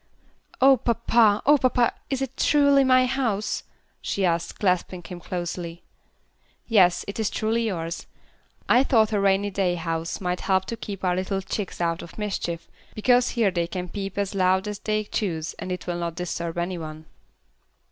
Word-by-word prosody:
"Oh, 270 0 +7
papa! 230 -2 +3
Oh, 290 +1 +6
papa! 245 -2 +2 0.2
is 270 -1 -1
it 265 -1 -6
truly 280 -2 +4
my 255 -1 +5
house?" 240 -6 -1 0.4
she 195 - -1
asked, 170 -1 -1
clasping 180 -2 0
him 180 -1 -8
closely. 175 -1 -5 0.8
"Yes, 185 -6 +4
it 200 - -5
is 220 - +1
truly 225 +1 0
yours. 165 -4 -4 0.6
I 250 +2 +5
thought 225 -5 +3
a 205 - +2
rainy 200 +1 +2
day 185 -2 +1
house 165 -1 -3
might 180 -1 -2
help 190 -1 +1
to 230 - -4
keep 200 -3 -7
our 180 -1 +2
little 190 +1 -2
chicks 195 0 -4
out 170 -1 0
of 170 - -11
mischief, 190 -5 -3 0.3
because 245 +3 +3
here 225 -5 +1
they 170 -2 -1
can 180 0 -5
peep 195 +1 -5
as 200 -1 -1
loud 190 +1 +2
as 210 -1 -4
they 215 0 -1
choose 170 -6 -3
and 185 - -5
it 180 -1 -4
will 175 -1 -3
not 170 -1 -3
disturb 170 -1 -4
any 175 +1 -2
one." 155 0 -8
195 Hz, 175 wpm, -25 LUFS, 175-225 Hz, 0.8 s, Oh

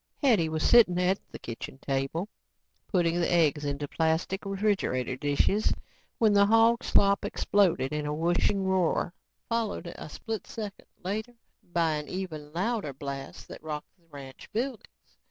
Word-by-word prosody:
Hetty 210 - +4
was 155 0 0
sitting 210 -7 +6
at 185 +2 +2
the - - -7
kitchen 115 +3 -7
table, 135 +7 -2 0.6
putting 175 -2 +1
the 170 - +1
eggs 155 -4 +3
into 145 0 -2
plastic 160 +5 0
refrigerator 195 - 0
dishes 145 +10 +2 0.4
when 220 -3 +4
the 200 0 +6
hog 225 +2 +4
slop 200 0 +3
exploded 175 -9 +2
in 150 0 -2
a - - -1
whooshing 175 +4 +1
roar, 185 -2 +1 0.3
followed 225 -6 -2
a - - -8
split 220 +6 -5
second 210 -3 -7 0.2
later 215 +6 -3 0.3
by 170 -2 0
an 150 - -6
even 160 -6 -5
louder 195 - -1
blast 135 0 -7
that - - -9
rocked 150 -1 -6
the 170 -3 -33
ranch 135 -3 -11
buildings. 235 0 -2
175 Hz, 150 wpm, -28 LUFS, 150-205 Hz, 0.6 s, sitting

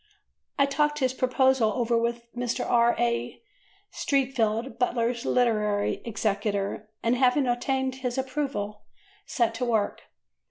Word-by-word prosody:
I 280 - +5
talked 295 +1 +1
his 260 -3 +1
proposal 255 -3 +2
over 240 -1 0
with 235 0 -1
Mr. 245 -1 -2
R. 235 0 +4
A. 120 0 -1 0.5
Streatfeild, 245 -3 0
Butler's 240 0 0
literary 210 -4 +1
executor, 205 -2 -2
and, 230 +2 +2
having 260 +2 +3
obtained 260 +2 -1
his 250 -1 -3
approval, 260 -6 -3 0.5
set 235 -3 +1
to 250 +2 -2
work. 220 -4 0
240 Hz, 120 wpm, -26 LUFS, 220-260 Hz, 0.5 s, I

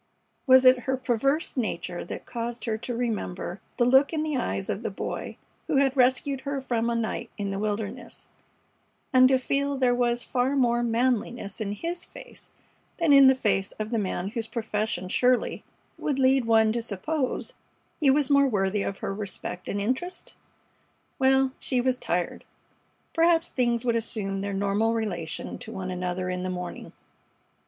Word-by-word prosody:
Was 260 0 +7
it 255 0 +7
her 265 - +2
perverse 265 +5 0
nature 180 -7 -3
that - - -7
caused 235 0 -5
her 225 -2 0
to 240 +2 -5
remember 205 -6 -3 0.2
the 240 - +3
look 265 +3 +5
in 310 -2 -1
the 305 -2 -1
eyes 255 - -2
of - - -2
the - - -2
Boy - - -5 0.3
who - - 0
had 270 -1 +3
rescued 260 +1 +2
her 280 0 -3
from 235 -3 -1
a 235 - 0
night 230 0 -2
in 200 -1 -2
the 195 - -3
wilderness, 215 +3 -4 0.9
and 255 0 +7
to 265 - +5
feel 280 +2 -1
there 255 -2 +3
was 240 -1 +1
far 255 +2 0
more 240 -3 +2
manliness 235 -3 -1
in 205 -1 -2
his 335 - -3
face - - -12 0.5
than 330 -4 +4
in 275 -1 +9
the 265 - +6
face 205 -5 0
of 215 +1 -5
the 230 - +1
man 190 -1 -2
whose 225 +1 -4
profession 215 -5 -2
surely 250 +6 +1 0.4
would 285 -3 -1
lead 265 -1 +3
one 220 -1 +4
to 235 +1 -1
suppose 250 +7 -2 0.5
he 290 - +4
was 280 0 +3
more 280 0 +5
worthy 200 -3 0
of 195 0 -3
her - - -2
respect 195 -3 -4
and 200 - -1
interest? 260 - -3 0.8
Well, 265 0 +4
she 255 - 0
was 255 0 +1
tired. 175 0 -2 0.7
Perhaps 330 0 +3
things 240 -1 0
would 235 -1 +2
assume 210 -4 -2
their 200 +1 -3
normal 200 +3 +1
relation 175 -7 -3
to - - -8
one 185 -1 -5
another 180 0 -3
in 180 0 -3
the 185 - -3
morning. 180 -1 -6
235 Hz, 175 wpm, -26 LUFS, 205-265 Hz, 0.9 s, in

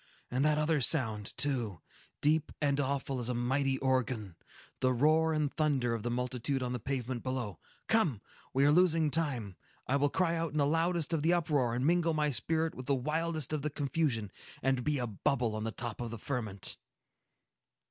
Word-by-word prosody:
And 130 +3 +1
that 150 0 +3
other 150 -1 +2
sound, 110 -7 +1
too,—deep 140 - -1
and 145 -1 +1
awful 135 -1 -1
as 120 0 -3
a 125 - -1
mighty 135 +3 +1
organ,—the 130 -2 -2
roar 155 +6 +3
and 150 -2 0
thunder 135 -6 +1
of 115 - -2
the 120 - -2
multitude 125 +2 -1
on 125 0 -2
the 125 - -2
pavement 125 -1 -3
below! 125 - -3 0.3
Come! 175 - +2 0.3
We 135 +1 +3
are 145 - +6
losing 165 -2 +4
time. 130 - 0 0.3
I 135 - +2
will 145 +1 +2
cry 170 +1 +1
out 165 -2 -2
in - - -2
the 145 - +3
loudest 165 +2 +1
of 160 - +1
the 165 +3 +3
uproar, 145 -8 +1
and 125 +2 0
mingle 170 0 +3
my 150 -1 +1
spirit 160 +7 0
with 130 0 -9
the 140 - +3
wildest 155 +2 -2
of 155 - -1
the 150 - -1
confusion, 140 - -1 0.3
and 130 -1 +1
be 150 +1 +1
a 125 - -1
bubble 115 +1 0
on 110 0 -3
the 115 - -2
top 120 0 -5
of 120 - -3
the 115 - -6
ferment!" 110 -5 -2
135 Hz, 190 wpm, -32 LUFS, 120-155 Hz, 0.3 s, are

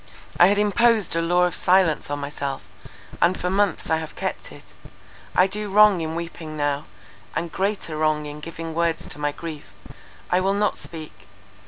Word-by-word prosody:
I 175 - +9
had 200 +1 +3
imposed 210 -2 +3
a 165 - +2
law 175 +2 +3
of 180 0 +1
silence 180 -5 +3
on 145 - -2
myself; 140 -1 -4 0.6
and 180 +2 +3
for 180 - -1
months 200 -3 +1
I 160 - +4
have 160 -1 -7
kept - - -4
it. - - -15 0.6
I 180 - +6
do 205 +2 -3
wrong 205 -2 +6
in 160 0 -3
weeping 165 -2 -6
now, 145 0 -1 0.5
and 165 0 -2
greater 195 -4 -2
wrong 155 -1 +1
in 150 0 -7
giving 165 +1 -7
words 170 0 0
to - - -6
my 145 0 0
grief. 150 -7 -8 0.6
I 180 - +4
will 195 +2 +1
not 210 +1 +1
speak! 160 -2 -8
165 Hz, 180 wpm, -23 LUFS, 155-190 Hz, 0.6 s, I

